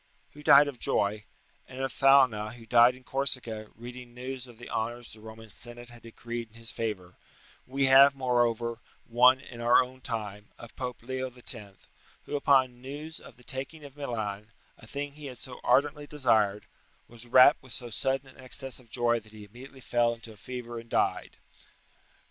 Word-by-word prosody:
] 140 0 -37
who 150 - -12
died 145 0 +7
of 135 -4 -6
joy; 105 +1 0 0.4
and 130 0 -8
of 135 -1 -2
Thalna, 130 -6 +4
who 115 -2 -13
died 120 +2 +6
in 130 - -17
Corsica, 125 -5 +2
reading 120 +1 -10
news 130 0 -6
of 120 -2 -15
the 120 - -11
honours 120 +1 -4
the 110 - -14
Roman 110 0 -12
Senate 120 +3 -6
had 120 -1 -13
decreed 115 +1 -7
in 110 - -24
his 115 +1 -7
favour, 95 -6 -5 0.5
we 135 +1 +1
have, 135 +1 +7
moreover, 120 -3 0 0.3
one 125 +2 +5
in 120 -2 -11
our 120 +2 +5
time, 105 -4 -5
of 120 - -12
Pope 125 -2 -6
Leo 130 +1 -3
X., 125 0 -4 0.7
who - - -5
upon 130 -3 +3
news 145 +4 -7
of 120 - -15
the 125 - -19
taking 135 +4 -5
of 140 -1 -12
Milan, 110 -6 -4 0.2
a 110 - -16
thing 145 +3 -5
he 145 0 -10
had 125 -2 -9
so 125 +1 -7
ardently 145 +1 +2
desired, 110 -8 +1 0.4
was 120 0 -11
rapt 130 +3 +7
with 130 - -15
so 120 -1 -7
sudden 135 +4 -1
an 130 - -17
excess 130 +1 -2
of 120 -3 -20
joy 120 0 +1
that 110 -1 -19
he 105 -1 -11
immediately 130 +6 -13
fell 120 -1 +1
into 115 -1 -13
a - - -17
fever 120 0 -7
and 115 0 -13
died. - - 0
120 Hz, 185 wpm, -28 LUFS, 115-130 Hz, 0.7 s, died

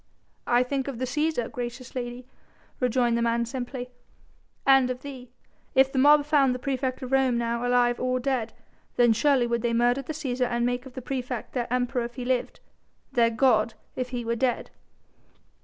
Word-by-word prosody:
"I 245 +1 +4
think 265 +1 -2
of 275 -4 -4
the 255 - -2
Cæsar, 300 -2 -1
gracious 245 +1 -6
lady," 245 0 -5 0.5
rejoined 245 -1 +2
the 235 - 0
man 235 0 +1
simply, 250 +1 -5 0.7
"and 270 -2 +5
of 255 0 -4
thee. 260 -3 -9 0.5
If 265 0 +5
the 265 - 0
mob 290 +2 +6
found 280 -4 +3
the - - -2
praefect 260 0 -2
of 255 - -6
Rome 265 -2 +3
now 235 0 -1
alive 245 -1 +3
or 255 0 0
dead, 250 -3 -1 0.4
then 240 -2 +5
surely 260 +2 +3
would 235 -1 -1
they 235 0 0
murder 240 +3 +2
the 295 +4 -6
Cæsar 255 -4 -1
and 240 0 0
make 245 +1 -2
of 260 - -13
the 260 - -7
praefect 250 -2 -4
their 240 -2 -2
Emperor 250 -1 0
if 240 - -9
he 250 -2 -5
lived, 255 -1 -1 0.5
their 235 -1 +3
god 225 -1 +2 0.2
if 255 -1 -3
he 245 -2 -4
were 230 0 0
dead." 245 0 -1
250 Hz, 190 wpm, -26 LUFS, 240-265 Hz, 0.7 s, mob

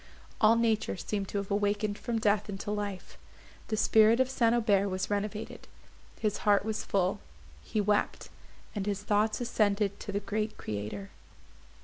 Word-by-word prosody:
All 220 +1 +6
nature 225 -3 +1
seemed 200 +2 -3
to 205 - -4
have 200 0 -4
awakened 205 +1 0
from 230 +2 -3
death 210 -1 +1
into 200 +1 -4
life; 205 -2 -5 0.5
the 215 - -1
spirit 220 +2 +5
of 260 0 +2
St. 235 -3 +3
Aubert 205 -4 +2
was 185 +2 -3
renovated. 210 +1 -3 0.5
His 210 -2 0
heart 205 -1 +3
was 220 -1 -2
full; 185 -2 0 0.4
he 215 - -2
wept, 205 0 0 0.4
and 205 -2 -3
his 200 -1 -2
thoughts 210 +1 +1
ascended 205 -3 +1
to - - -6
the 200 - -1
Great 210 +2 -3
Creator. 105 -1 -5
205 Hz, 155 wpm, -30 LUFS, 200-220 Hz, 0.5 s, All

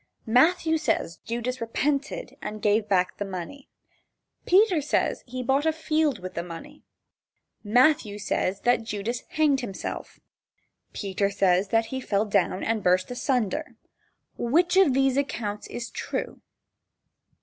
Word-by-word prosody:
Matthew 320 +7 +3
says 165 - -1
Judas 240 +2 -3
repented 285 - -2
and 210 0 -5
gave 210 0 +1
back 185 -2 +1
the - - -2
money. 195 +8 -7 0.8
Peter 370 -3 +5
says 285 - 0
that - - -26
he 255 +1 -4
bought 275 +5 +1
a - - +4
field 310 -4 0
with 185 -1 -8
the 170 - -3
money. 180 - -10 0.8
Matthew 245 0 +3
says 195 -1 -1
that 245 -1 +3
Judas 225 +2 -3
hanged 295 -3 +2
himself. 195 -6 -6 0.7
Peter 200 0 -1
says 195 -1 +2
that 225 +3 +2
he 260 - -2
fell 205 -3 0
down 195 -2 +1
and 225 -1 0
burst 185 +3 +2
asunder. 250 +3 -1 0.6
Which 340 +10 +2
of 380 -9 +5
these 270 -1 +2
accounts 215 -7 -2
is 240 0 -6
true? - - -4
240 Hz, 140 wpm, -26 LUFS, 205-290 Hz, 0.8 s, Peter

